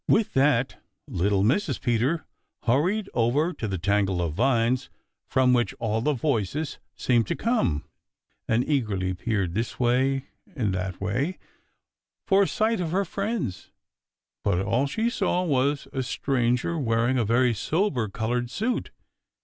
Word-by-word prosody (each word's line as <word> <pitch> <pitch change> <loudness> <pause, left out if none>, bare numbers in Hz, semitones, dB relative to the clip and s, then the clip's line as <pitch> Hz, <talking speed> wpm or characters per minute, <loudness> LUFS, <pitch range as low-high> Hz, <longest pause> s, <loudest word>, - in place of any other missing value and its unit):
With 215 - +3
that 135 -2 +2 0.2
little 100 +2 +1
Mrs. 140 - +1
Peter 125 +8 0 0.4
hurried 180 - +1
over 140 +9 +2
to 110 - -4
the 95 -2 -2
tangle 100 0 +1
of 85 -3 -1
vines 120 - +1 0.4
from 130 -1 +3
which 120 -5 +1
all 110 0 -1
the 150 +5 +1
voices 140 - -1 0.2
seemed 120 -4 +2
to - - -1
come 220 - 0 0.6
and 115 +3 +1
eagerly 105 -10 0
peered 95 -2 -1
this 115 +4 -3
way 130 +2 +2 0.3
and 110 -9 0
that 95 0 -3
way 125 - -1 0.9
for 195 0 +4
a 195 - +3
sight 220 0 +1
of 175 -3 -1
her 195 +4 +1
friends. 195 - -3 0.7
But 90 - +1
all 115 +8 +1
she 220 +11 -1
saw 190 -6 0
was 140 -3 +1
a 135 - -1
stranger 125 +5 0
wearing 120 0 +1
a - - +2
very 120 +3 +3
sober 130 - 0
colored 120 +4 -2
suit. 225 - -2
125 Hz, 145 wpm, -26 LUFS, 110-155 Hz, 0.9 s, for